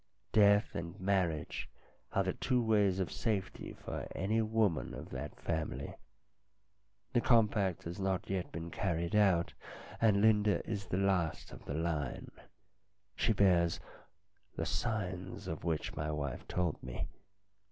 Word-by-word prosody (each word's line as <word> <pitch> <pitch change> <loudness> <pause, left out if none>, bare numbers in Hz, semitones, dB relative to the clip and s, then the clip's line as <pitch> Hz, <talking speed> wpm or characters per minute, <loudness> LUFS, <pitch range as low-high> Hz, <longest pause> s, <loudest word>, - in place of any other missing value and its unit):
Death 105 0 +5
and 85 +2 -5
marriage 95 -6 0 0.4
are 95 - +2
the 95 -1 0
two 125 -2 +1
ways 105 -5 +3
of 95 - -1
safety 105 -5 -2
for - - -4
any 105 +5 +1
woman 110 -6 +1
of - - -8
that 65 +3 -6
family. 75 -4 -2 1.2
The 120 - +4
com 115 -1 +6
pact 95 -5 -1
has 85 +3 -6
not 95 -1 0
yet 95 -2 -2
been 85 +1 -5
carried 85 -3 -1
out, 95 -5 +4 0.5
and 105 -3 +5
Linda 105 -1 +4
is 100 -3 -3
the 90 - -1
last 95 -5 +1
of - - -11
the 70 - -3
line. 80 -5 -2 0.8
She - - +2
bears 90 -5 +4 0.8
the - - -2
signs 95 -1 -2
of 80 -3 -4
which 80 -2 -1
my 75 +1 -2
wife 70 -4 -3
told 90 -4 -1
me. 60 -1 -4
95 Hz, 140 wpm, -34 LUFS, 85-105 Hz, 1.2 s, com